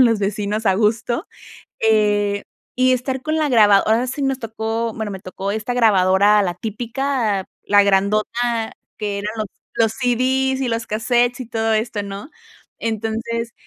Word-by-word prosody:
con -, -, +8 dB
los 225 Hz, -2 st, +2 dB
vecinos, 205 Hz, +2 st, -2 dB
a 195 Hz, -, +4 dB
gusto, 225 Hz, -, 0 dB, 0.5 s
eh, 205 Hz, -2 st, +2 dB, 0.3 s
y 255 Hz, 0 st, +3 dB
estar 260 Hz, +1 st, -1 dB
con 310 Hz, 0 st, -1 dB
la 305 Hz, -2 st, +1 dB
grabad 210 Hz, -5 st, +6 dB
ahora 225 Hz, +3 st, +3 dB
sí 260 Hz, +3 st, -4 dB
nos 270 Hz, -1 st, 0 dB
tocó, 225 Hz, -1 st, -3 dB
bueno 220 Hz, -2 st, -4 dB
me 190 Hz, -, -6 dB
tocó 190 Hz, +2 st, -5 dB
esta 220 Hz, +3 st, -3 dB
grabadora, 205 Hz, -3 st, +4 dB
la 180 Hz, -2 st, -1 dB
típica, 225 Hz, 0 st, -2 dB, 0.2 s
la 205 Hz, 0 st, +5 dB
grandota 215 Hz, +4 st, +1 dB, 0.3 s
que 205 Hz, -2 st, -2 dB
eran 205 Hz, +1 st, -3 dB
los 215 Hz, -, -2 dB, 0.3 s
los 225 Hz, -2 st, +2 dB
CDs 260 Hz, +2 st, +1 dB
y 260 Hz, -, 0 dB
los 230 Hz, -1 st, -2 dB
casetes, 240 Hz, +3 st, +1 dB
y 255 Hz, -, -6 dB
todo 225 Hz, -1 st, 0 dB
esto, 215 Hz, -1 st, -1 dB
¿no? 200 Hz, +6 st, -7 dB, 0.5 s
Entonces, 230 Hz, +1 st, -3 dB
225 Hz, 160 wpm, -20 LUFS, 205-245 Hz, 0.5 s, con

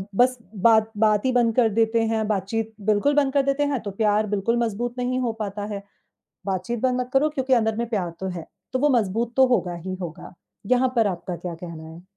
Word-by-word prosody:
बस 250 Hz, +3 st, +3 dB, 0.2 s
बात 220 Hz, +2 st, +4 dB
बात 215 Hz, 0 st, +3 dB
ही 260 Hz, -, +3 dB
बंद 235 Hz, -2 st, +2 dB
कर 235 Hz, -3 st, +4 dB
देते 225 Hz, +2 st, +2 dB
हैं, 220 Hz, -1 st, 0 dB
बातचीत 220 Hz, +2 st, -2 dB
बिल्कुल 215 Hz, +7 st, +2 dB
बंद 280 Hz, -2 st, +2 dB
कर 280 Hz, -, +4 dB
देते 275 Hz, +1 st, +1 dB
हैं 260 Hz, -, 0 dB
तो 200 Hz, -, -5 dB
प्यार 210 Hz, +1 st, +1 dB
बिल्कुल 230 Hz, +4 st, 0 dB
मजबूत 235 Hz, +2 st, -3 dB
नहीं 250 Hz, +1 st, -1 dB
हो 240 Hz, -3 st, 0 dB
पाता 205 Hz, -1 st, -4 dB
है, 200 Hz, 0 st, -6 dB, 0.6 s
बातचीत 215 Hz, +5 st, -2 dB
बंद 255 Hz, -1 st, +1 dB
मत 250 Hz, 0 st, -4 dB
करो 275 Hz, +3 st, +4 dB
क्योंकि 265 Hz, -2 st, -2 dB
अंदर 220 Hz, -2 st, +1 dB
में 235 Hz, 0 st, -2 dB
प्यार 195 Hz, -7 st, -1 dB
तो 190 Hz, -, -2 dB
है, 175 Hz, -3 st, -6 dB, 0.3 s
तो 255 Hz, -, +1 dB
वो 290 Hz, +3 st, +3 dB
मजबूत 225 Hz, +4 st, -2 dB
तो 265 Hz, 0 st, +6 dB
होगा 180 Hz, -5 st, -1 dB
ही 185 Hz, -, -3 dB
होगा, 165 Hz, 0 st, -8 dB, 0.3 s
यहाँ 255 Hz, +2 st, +2 dB
पर 225 Hz, -2 st, +4 dB
आपका 180 Hz, -1 st, -3 dB
क्या 175 Hz, -1 st, -6 dB
कहना 165 Hz, -1 st, -9 dB
है? 165 Hz, +2 st, -12 dB
225 Hz, 220 wpm, -24 LUFS, 195-250 Hz, 0.6 s, तो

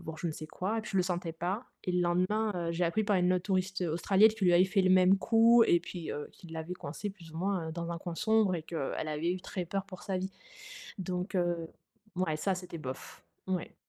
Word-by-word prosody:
voir, 160 Hz, 0 st, -7 dB
je 175 Hz, -, -3 dB
ne 165 Hz, -, -1 dB
sais 155 Hz, +1 st, -7 dB
quoi, 205 Hz, +8 st, -2 dB
et -, -, 0 dB
puis 215 Hz, -, -8 dB
je -, -, 0 dB
le 185 Hz, -, +4 dB
sentais 175 Hz, -2 st, -2 dB
pas. 180 Hz, +8 st, -3 dB, 0.2 s
Et 180 Hz, -, -1 dB
le 180 Hz, -, +2 dB
lendemain, 185 Hz, +5 st, +1 dB
heu, 170 Hz, -1 st, -1 dB
j'ai 170 Hz, +2 st, -2 dB
appris 195 Hz, +6 st, +1 dB
par 205 Hz, -1 st, +2 dB
une 180 Hz, 0 st, +3 dB
autre 180 Hz, -1 st, 0 dB
touriste, 190 Hz, -1 st, 0 dB
heu, 170 Hz, -, 0 dB
australienne 195 Hz, +5 st, +5 dB
qu'il 215 Hz, -3 st, -1 dB
lui 175 Hz, -, +6 dB
avait 180 Hz, +2 st, +6 dB
fait 195 Hz, +1 st, +2 dB
le 185 Hz, -, +3 dB
même 185 Hz, +1 st, +6 dB
coup 230 Hz, +2 st, +6 dB
et 175 Hz, -, +4 dB
puis, 175 Hz, -1 st, -7 dB
heu, 145 Hz, -, -5 dB
qui 175 Hz, -, -14 dB
l'avait 160 Hz, +2 st, -5 dB
coincée 180 Hz, +5 st, -5 dB
plus 175 Hz, -5 st, -14 dB
ou -, -, -8 dB
moins, 185 Hz, -2 st, -1 dB
heu, -, -, -5 dB
dans 170 Hz, +1 st, -4 dB
un 170 Hz, -, -4 dB
coin 175 Hz, 0 st, -5 dB
sombre 220 Hz, -2 st, +3 dB
et 160 Hz, -, -5 dB
que, 160 Hz, -5 st, -3 dB
elle 155 Hz, -, -3 dB
avait 155 Hz, +3 st, -1 dB
eu 185 Hz, -, -4 dB
très 180 Hz, -1 st, -5 dB
peur 195 Hz, +3 st, -2 dB
pour 185 Hz, -2 st, -10 dB
sa 190 Hz, -, -2 dB
vie. 190 Hz, +1 st, -3 dB, 0.7 s
Donc, 180 Hz, +1 st, -3 dB
heu, 175 Hz, -2 st, 0 dB, 0.5 s
mouais 180 Hz, -4 st, 0 dB
ça 190 Hz, +5 st, 0 dB
c'était 180 Hz, -2 st, -7 dB
bof. 130 Hz, -3 st, -8 dB, 0.2 s
Ouais. 185 Hz, -3 st, -3 dB
180 Hz, 265 wpm, -31 LUFS, 170-195 Hz, 0.7 s, lui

